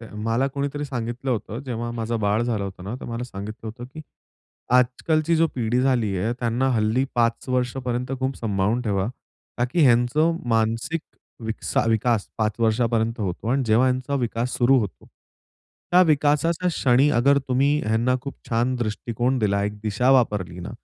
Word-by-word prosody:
ते 115 - -10 0.2
मला 115 +4 +1
कोणीतरी 140 +1 -3
सांगितलं 125 -1 -4
होतं. 115 -1 -3
जेव्हा 120 -2 -4
माझं 115 0 -2
बाळ 105 +2 +1
झालं 110 -4 -1
होतं 95 -2 -8
ना, 105 +4 -4
तेव्हा 120 -2 -6
मला 120 +1 -3
सांगितलं 110 0 -8
होतं, 115 +3 -7
की 130 +5 -10 0.8
आजकालची 155 +6 +2
जी 165 +1 +4
पिढी 120 0 0
झाली 120 -7 +1
आहे, 110 +6 0
त्यांना 120 +2 +1
हल्ली 110 +3 +1
5 115 +1 0
वर्षापर्यंत 125 0 -1
खूप 130 +1 -1
सांभाळून 105 +1 0
ठेवा. 100 -4 0 0.5
कारण 125 +8 -1
ह्यांचं 135 +7 +3
मानसिक 115 +8 0 0.4
विकसा 110 -1 -1
विकास 115 -1 +1
5 110 -1 +1
वर्षापर्यंत 115 0 +1
होतो 95 +2 -3
आणि 130 +2 +2
जेव्हा 115 +4 +4
ह्यांचा 130 +2 -1
विकास 120 -1 -2
सुरू 130 +2 +4
होतो. 105 -6 -5 0.9
या 180 - +8
विकासाच्या 160 +2 +2
क्षणी 135 -4 +3
अगर 140 +2 +4
तुम्ही 140 +4 +2
ह्यांना 115 +4 +1
खूप 140 - -6
छान 120 +2 +1
दृष्टिकोन 120 +3 -1
दिला, 100 -3 +1
एक 105 +1 -3
दिशा 110 +4 +1
वापरली 105 -9 +2
ना, 90 +4 -6
120 Hz, 160 wpm, -23 LUFS, 110-130 Hz, 0.9 s, या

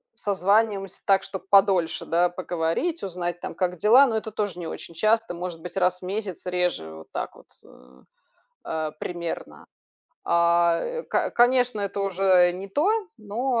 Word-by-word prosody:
созваниваемся 200 0 0
так, 195 -1 +4
чтоб 190 -1 -8
подольше, 195 -4 +3
да, 175 +2 +3
поговорить, 175 - -2
узнать 175 -2 -3
там, - - -6
как 180 -1 -1
дела. 230 - +6
Но 225 -3 0
это 220 0 -5
тоже 205 -4 -3
не 170 - -5
очень 170 - -7
часто, 215 +4 +1
может 175 -1 -6
быть, 180 +3 -8
раз 180 -1 +2
в - - -8
месяц 195 -2 -4
и - - 0
реже, 180 - -1
вот 80 0 -12
так - - -5
вот, - - -18 0.2
э, 65 +1 -19 0.6
а, 155 -1 -3
примерно. 170 +2 -6 0.6
Ай, 170 - +2
ка - - 0
конечно, 245 -2 +3
это 200 0 -3
уже 190 -2 +4
и - - -5
не 190 +2 -7
то. 295 - +1 0.3
Но, 230 +4 -1
185 Hz, 170 wpm, -25 LUFS, 175-210 Hz, 0.6 s, дела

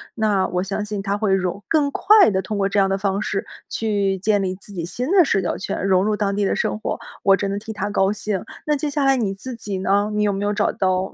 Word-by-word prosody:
那 210 -4 +1
我 180 0 -1
相 195 +2 -3
信， 210 -1 -4
他 200 0 -1
会 210 -2 0
融 185 +1 -1
更 295 -3 +2
快 420 - +6
地 190 -1 0
通 205 +3 -4
过 195 -1 +1
这 200 - +1
样 195 -1 +3
的 195 - +1
方 195 0 -1
式 195 -1 -2 0.2
去 200 -3 0
建 205 +2 +1
立 185 -1 -2
自 200 +2 -10
己 175 -3 -4
新 245 - -3
的 385 -2 +6
社 195 - +1
交 175 - -2
圈， 195 0 -3
融 190 -1 +3
入 215 0 +1
当 205 -1 -1
地 205 - 0
的 - - +1
生 - - -1
活， - - -3 0.3
我 195 0 +6
真 195 -1 -2
的 200 - -2
替 220 +2 -8
他 205 -1 -3
高 195 -1 +2
兴。 210 -2 -3 0.2
那 300 - +2
接 300 +1 -2
下 285 0 -1
来 270 0 +4
你 215 -5 0
自 255 +6 -7
己 205 -4 -4
呢？ 200 +2 +1
你 210 0 +1
有 205 - +2
没 195 +1 -3
有 205 - +1
找 - - +1
到 185 0 -1
200 Hz, 295 characters per minute, -21 LUFS, 195-215 Hz, 0.3 s, 快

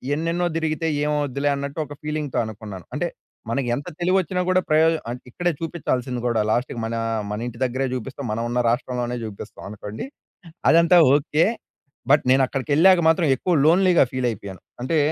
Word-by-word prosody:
ఎన్నెన్నో 165 +3 -1
తిరిగితే 160 0 -1 0.2
ఏమవుద్దిలే 145 -1 0
అన్నట్టు 140 +2 -5
ఒక 145 - -9
ఫీలింగ్‌తో 150 -2 -3
అనుకున్నాను. 105 -4 -8
అంటే - - -1 0.4
మనకు 125 +2 -1
ఎంత 140 +3 -6
తెలివోచ్చినా 185 +1 +1
కూడా 185 0 +3
ప్రయోజ 160 +1 +4 0.2
అన్ 120 +1 -5
ఇక్కడే 175 +6 0
చూపించాల్సింది 130 -7 -2
కూడా 115 -2 +1
లాస్ట్‌కి 120 +1 -1
మన 115 +1 -3 0.4
మన 105 - -3
ఇంటి 120 -1 -8
దగ్గరే 130 +2 -1
చూపిస్తాం, 135 +3 -6
మనం 115 +2 -2
ఉన్న 125 - 0
రాష్ట్రంలోనే 125 0 -2
చూపిస్తాం 105 -2 -9
అనుకోండి. 105 - -7 0.6
అదంతా 170 +2 +6 0.2
ఓకే. 150 +2 +2 0.7
బట్ 145 - +5
నేనక్కడికెళ్ళాక 145 +7 +4
మాత్రం 165 +1 +2
ఎక్కువ 175 +7 -1
లోన్లీ‌గా 180 +1 +5
ఫీలైపోయాను. 110 -7 -3 0.2
అంటే 145 +6 0
140 Hz, 145 wpm, -23 LUFS, 120-165 Hz, 0.7 s, అదంతా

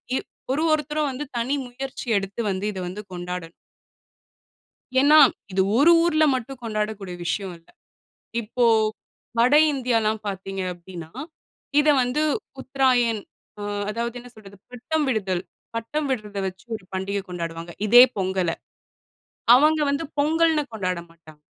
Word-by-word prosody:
இ - - +2 0.3
ஒரு 305 +4 +1
ஒருத்தரும் 300 -1 0
வந்து 270 +3 -5
தனி 245 +4 0
முயற்சி 260 0 -7
எடுத்து 195 +4 -3
வந்து 190 +1 -2
இத 190 - -6
வந்து 195 +4 -6
கொண்டாடணும். 180 -2 -5 1.5
ஏன்னா 295 +3 +6 0.3
இது 190 - +2 0.2
ஒரு 315 +5 +6
ஊர்ல 315 -2 +3
மட்டும் 260 +1 -6
கொண்டாடக்கூடிய 210 -4 -3
விஷயம் 185 +1 -2
இல்ல. 165 - -28 0.7
இப்போ, 235 +3 -1 0.7
வட 250 +5 +5 0.2
இந்தியால்லாம் 225 -5 0
பார்த்தீங்க 195 -1 -4
அப்படீன்னா, 170 -2 -10 0.7
இத 300 - +1
வந்து 250 +5 0 0.4
உத்தராயண் 250 -5 +2 0.4
அ - - -5 0.3
அதாவது 235 +2 -3
என்ன 245 - -12
சொல்றது? 200 -2 -14 0.2
பட்டம் 295 +5 -1
விடுதல், 190 -7 -1 0.3
பட்டம் 285 +7 -2
விடுறத 210 -5 -3
வச்சு 185 0 -7
ஒரு 185 - -16
பண்டிகை 195 +1 -2
கொண்டாடுவாங்க, 170 -1 -5
இதே 245 +4 +9 0.2
பொங்கல. 185 -2 0 1.0
அவங்க 305 +4 +4
வந்து 280 +3 -1
பொங்கல்ன்னு 320 +1 +3
கொண்டாட 185 -4 -2
மாட்டாங்க. 155 -2 -17
220 Hz, 130 wpm, -24 LUFS, 190-270 Hz, 1.5 s, இதே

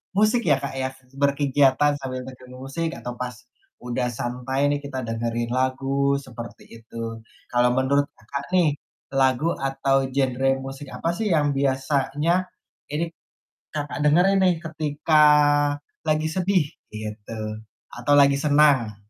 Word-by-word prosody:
musik 215 +4 +3
ya, 145 -5 +4
Kak, 140 - -4
ya, 130 0 -1 0.3
berkegiatan 140 0 +3
sambil 130 -1 -5
dengerin 125 -1 -11
musik 135 +5 -3
atau 125 0 -6
pas 125 -1 -4 0.5
udah 125 0 -1
santai 125 +4 -1
nih 145 - 0
kita 130 -2 -5
dengerin 115 +1 -2
lagu, 135 +2 +1
seperti 120 -4 -9 0.2
itu. 115 0 -6 0.3
Kalau 125 0 +3
menurut 140 +2 +2
Kakak 140 +6 -6
nih, 160 -5 +3 0.4
lagu 135 +4 +2
atau 135 0 +1
genre 135 -1 +1
musik 135 +1 -8
apa 165 - -2
sih 215 +3 -1
yang 145 -3 +2
biasanya 140 +6 0 0.4
ini 155 +3 0
k - - -68 0.6
Kakak 145 0 -3
dengerin 180 +6 +4
nih 185 -2 +4
ketika 155 -1 +2 0.8
lagi 155 0 +2
sedih 185 0 +2 0.3
gitu 110 0 -7 0.6
atau 125 +4 0
lagi 140 -1 +5
senang? 145 -7 +3
135 Hz, 130 wpm, -24 LUFS, 130-150 Hz, 0.8 s, lagi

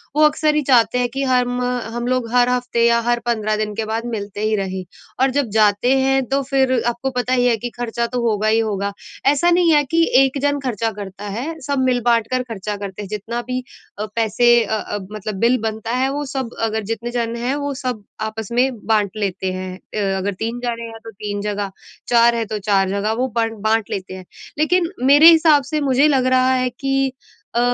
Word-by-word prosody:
वो 305 - +4
अक्सर 305 0 +2
ही 300 - +2
चाहते 250 0 +4
हैं 245 - +1
कि 270 +3 -3
हम 250 -1 +1 0.3
हम 240 +1 -3
लोग 255 -2 0
हर 245 0 +4
हफ़्ते 245 -2 0
या 235 0 +4
हर 240 +1 +1
15 215 -3 0
दिन 210 -1 -2
के 220 0 -2
बाद 230 +1 -2
मिलते 205 0 -6
ही 215 0 +1
रहें। 190 -2 -3 0.4
और 265 - +4
जब 265 -6 +1
जाते 215 +4 +3
हैं, 270 0 +2
तो 275 +3 0
फ़िर 265 -1 +2
आपको 240 +3 -1
पता 250 +1 -1
ही 245 -1 +3
है 240 -2 +4
कि 245 +3 -5
खर्चा 235 0 -2
तो 250 0 -3
होगा 215 -1 0
ही 220 +1 +3
होगा। 200 -2 -1 0.4
ऐसा 345 +5 +2
नहीं 345 -1 +4
है 295 -1 +4
कि 330 0 +4 0.2
1 270 +1 0
जन 285 0 +1
खर्चा 225 -2 -1
करता 200 +1 -8
है, 255 - -3 0.2
सब 280 -2 0
मिल-बाँट 240 -3 +2
कर 255 0 +1
खर्चा 210 0 -4
करते 195 +1 -6
हैं, 200 - -8
जितना 220 +3 -4
भी 255 0 -2 0.4
अ, 215 - -1
पैसे 230 +2 +3
अ 220 - -2
अ, 205 - -4
मतलब 210 -2 -5
बिल 255 +2 +4
बनता 220 +1 -6
है, 265 - +1
वो 290 +1 -3
सब 255 -3 -3 0.2
अगर 220 0 -2
जितने 235 +1 -4
जन 235 -1 -2
हैं, 245 +4 -1
वो 285 -1 -3
सब 240 -5 -3 0.2
आपस 220 0 -4
में 245 -2 0
बाँट 210 -3 +2
लेते 190 -2 -2
हैं। 185 0 -5 0.3
अ, 195 -1 0
अगर 200 +1 -2
3 230 +2 -3
जने 235 -1 -3
हैं 225 - -10
तो 225 - -9
3 205 0 -5
जगह, 205 -1 -3 0.4
4 235 0 +4
है 230 -1 -1
तो 210 0 -4
4 195 -1 +1
जगह 200 +2 -1
वो 260 - +1
बट 225 -1 +1
बाँट 220 0 +1
लेते 185 -1 -5
हैं। 185 - -10 0.3
लेकिन 340 +3 +2 0.2
मेरे 290 +4 +8
हिसाब 315 -4 +5
से 305 +3 -2
मुझे 275 +1 +3
लग 265 -3 +2
रहा 255 0 +4
है 255 -1 +1
कि 270 +1 -1 0.4
अ, - - +3
235 Hz, 220 wpm, -20 LUFS, 215-260 Hz, 0.4 s, मेरे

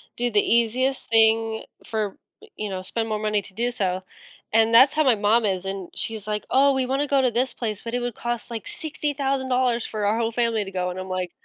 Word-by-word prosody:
do 240 0 -1
the 210 - +4
easiest 245 +3 +1
thing 225 0 +3 0.2
for 215 -3 -3 0.4
you 210 - -3
know, 185 -1 -4
spend 225 +4 -3
more 215 -1 -1
money 210 -1 0
to 195 - -14
do 235 +5 0
so," 190 -5 -2 0.5
and 225 0 +4
that's 260 +4 +7
how 310 - +3
my 260 -5 +4
mom 215 +3 +3
is, 190 -2 0
and 195 -2 -5
she's 220 -2 -4
like, 210 0 -2
"Oh, 275 +1 +4
we 265 -1 0
want 265 +2 0
to 290 - 0
go 275 -1 +3
to 255 -2 +2
this 245 +2 0
place, 215 -4 -3
but 230 0 -6
it 245 - +1
would 240 -2 -3
cost, 240 0 -4
like, 225 -3 -5
$60,000 265 -5 -1
for 215 -2 -3
our 210 +2 +2
whole 230 0 0
family 230 -2 +1
to 195 - -8
go," 180 -1 -1
and 180 +1 -5
I'm 185 - -6
like, 185 -1 -2
225 Hz, 235 wpm, -24 LUFS, 210-250 Hz, 0.5 s, that's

